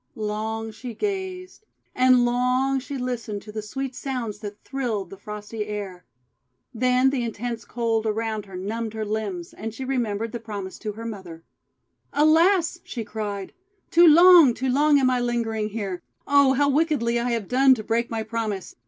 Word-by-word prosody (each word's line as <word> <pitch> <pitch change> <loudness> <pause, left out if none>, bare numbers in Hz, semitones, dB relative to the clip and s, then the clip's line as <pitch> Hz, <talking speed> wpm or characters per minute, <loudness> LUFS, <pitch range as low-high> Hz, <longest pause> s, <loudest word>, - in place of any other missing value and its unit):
Long 220 +1 -3
she 230 +1 -8
gazed; 380 - -4 0.3
and 255 -1 +5
long 250 +2 +1
she 275 +1 -6
listened 235 -5 -4
to 210 - -10
the 215 0 -4
sweet 265 +5 -5
sounds 245 -6 -4
that 210 -1 -8
thrilled 230 -9 -3
the - - -7
frosty 210 +1 -6
air. 200 -4 -6 0.7
Then 255 +2 +3
the 270 -3 -1
intense 235 0 -4
cold 225 -2 -1
around 220 -1 -2
her 190 - -10
numbed 220 +4 -4
her 220 -1 -3
limbs, 205 -5 -4
and 225 +1 -6
she 265 - -5
remembered 230 -4 -1
the 235 - -5
promise 205 -4 -7
to 210 -1 -4
her 225 +2 -8
mother. 185 -7 -8 0.7
THE - - -10
PROMISE 305 +1 +6
BROKEN 330 +2 +6
"ALAS!' 355 -3 0
she 235 - -5
cried, 205 -3 -5 0.4
'too 345 +1 +7
long, 335 -5 +8
too 260 0 -2
long 290 +2 +4
am 255 -1 +3
I 250 - +1
lingering 230 -3 -1
here! 200 -4 -4 0.2
Oh, 280 -2 +5
how 285 +2 +2
wickedly 280 -5 +1
I 240 +1 -1
have 225 -4 -2
done 265 +1 +5
to 220 - -7
break 230 +2 0
my 225 -1 -2
promise! 215 -3 -4
230 Hz, 180 wpm, -24 LUFS, 210-265 Hz, 0.7 s, long